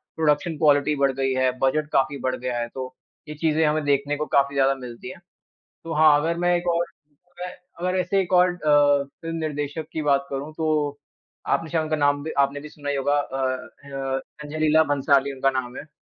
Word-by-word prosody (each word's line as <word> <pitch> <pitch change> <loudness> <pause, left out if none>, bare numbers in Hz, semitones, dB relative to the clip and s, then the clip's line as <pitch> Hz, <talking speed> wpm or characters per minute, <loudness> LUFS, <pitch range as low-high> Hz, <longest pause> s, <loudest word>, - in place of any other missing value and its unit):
Production 155 0 +1
quality 145 -1 +3
बढ़ 140 -1 +2
गई 135 0 0
है, 130 0 +2
बजट 145 +3 +1
काफ़ी 135 +1 +2
बढ़ 130 - 0
गया 125 -1 -3
है, 120 - -2
तो 130 0 -7 0.4
ये 150 - -6
चीज़ें 160 0 +1
हमें 150 0 +1
देखने 145 +1 +1
को 150 - -2
काफ़ी 140 0 +2
ज़्यादा 135 0 +3
मिलती 125 +6 -9
है। 180 - -9 0.7
तो 165 0 -5
हाँ, 155 -1 +6
अगर 165 +2 -1
मैं 175 0 +2
एक 175 0 -6
और 170 +1 +1 0.5
मैं 180 - -4 0.3
अगर 180 +1 0
ऐसे 190 +2 +1
एक 185 0 -4
और 180 0 +6
अ, 145 -3 +3
फ़िल्म 165 +4 -8
निर्देशक 150 0 -3
की 155 - -2
बात 140 -2 +2
करूँ 140 +3 -5
तो 150 -3 0 0.5
आपने 165 - 0
शायद 160 -1 0
उनका 155 0 -1
नाम 145 -1 +1
भी 160 - -4
आपने 140 +1 +2
भी 150 - -9
सुना 145 -1 -7
ही 145 - 0
होगा 145 +1 +1
अ, 130 -2 -2 0.2
ख - - -20
य 135 -1 -3 0.2
संजय 150 +1 -6
लीला 155 +1 +4
भंसाली 140 0 +2
उनका 135 +1 +1
नाम 125 0 -7
है। 155 - -9
145 Hz, 215 wpm, -24 LUFS, 135-155 Hz, 0.7 s, हाँ